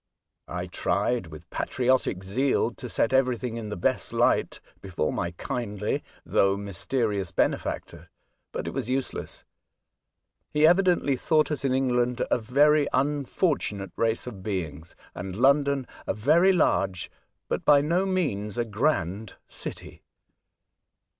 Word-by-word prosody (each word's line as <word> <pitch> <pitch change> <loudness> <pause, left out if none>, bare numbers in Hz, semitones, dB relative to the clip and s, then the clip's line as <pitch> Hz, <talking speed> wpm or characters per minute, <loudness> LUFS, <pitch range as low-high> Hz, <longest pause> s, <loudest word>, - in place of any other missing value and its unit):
I - - -4
tried 120 -7 -1
with 80 +2 -11
patriotic 125 -6 0
zeal 120 +5 +1
to 125 +1 -9
set 115 +2 +1
everything 125 -3 +1
in 115 -2 -5
the 105 - -4
best - - 0
light - - +2 0.2
before 90 -5 -2
my 85 - -1
kindly, 105 -6 -3 0.2
though 100 0 +2
mysterious, 100 -1 -2
benefactor, - - -2 0.4
but - - -4
it - - -2
was 115 - -4
use 130 0 -1
less. - - -8 1.0
He 150 +1 +3
evidently 175 -4 +4
thought 155 +4 +2
us 150 - -2
in 130 -2 +1
England 125 -2 +1
a - - +3
very 145 +5 +4
unfortunate 140 - 0
race 115 0 0
of 110 -6 -8
beings, 85 -6 -4 0.2
and 90 +1 -6
London 140 +2 +3 0.2
a - - 0
very 155 - +4
large, 95 - +1 0.4
but - - -2
by 145 -1 +6
no 170 +6 +1
means 120 - -1
a 120 - +1
grand, 110 - -1
city. - - -7
125 Hz, 135 wpm, -26 LUFS, 100-140 Hz, 1.0 s, by